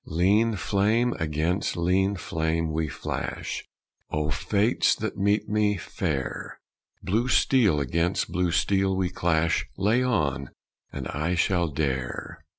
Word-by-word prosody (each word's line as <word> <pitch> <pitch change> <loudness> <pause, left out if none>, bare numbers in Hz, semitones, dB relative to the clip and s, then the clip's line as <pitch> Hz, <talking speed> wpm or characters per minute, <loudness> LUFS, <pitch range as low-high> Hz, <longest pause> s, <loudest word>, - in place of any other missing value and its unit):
Lean 105 +7 +2
flame 110 +5 +1
against 80 +5 -1
lean 95 +3 +2
flame 80 -2 -1
we 80 0 0
flash, 70 - -4 0.5
O, 75 0 -1
Fates 105 - +2
that 110 -2 -4
meet 100 +2 +1
me 105 -1 +1
fair; 65 -6 -4 0.4
Blue 110 +7 +1
steel 115 - +3
against 85 +7 0
blue 90 0 +1
steel 95 +3 +2
we 95 -1 0
clash 85 -2 +1
Lay 105 +6 +2
on, 75 - 0 0.4
and - - -5
I 80 +5 -1
shall 85 -1 +2
dare! 70 -4 -3
90 Hz, 125 wpm, -26 LUFS, 80-105 Hz, 0.5 s, steel